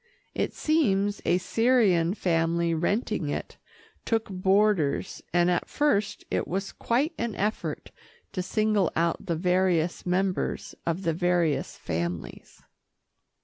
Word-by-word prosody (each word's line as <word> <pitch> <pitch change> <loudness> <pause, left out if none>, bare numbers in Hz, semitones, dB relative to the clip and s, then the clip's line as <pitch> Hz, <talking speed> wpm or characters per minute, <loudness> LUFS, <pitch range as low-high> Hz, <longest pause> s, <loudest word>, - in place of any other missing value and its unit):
It - - -1
seems 205 -11 +1
a 175 - +3
Syrian 200 -5 +2
family 170 -2 +1
renting 190 - -1
it, - - -4 0.5
took 225 -2 -1
boarders, 190 -4 +1
and 175 +1 +3
at 175 - -1
first 215 -9 0
it - - 0
was 195 +2 -3
quite 275 +8 0
an 235 -2 -2
effort 210 +2 -3 0.4
to 185 - -2
single 215 -1 +1
out 170 0 0
the 170 - 0
various 180 -1 +1
members 185 +1 -1
of 170 +3 -1
the 165 -2 +1
various 175 -3 0
families. 85 +1 -5
185 Hz, 120 wpm, -27 LUFS, 170-210 Hz, 0.5 s, a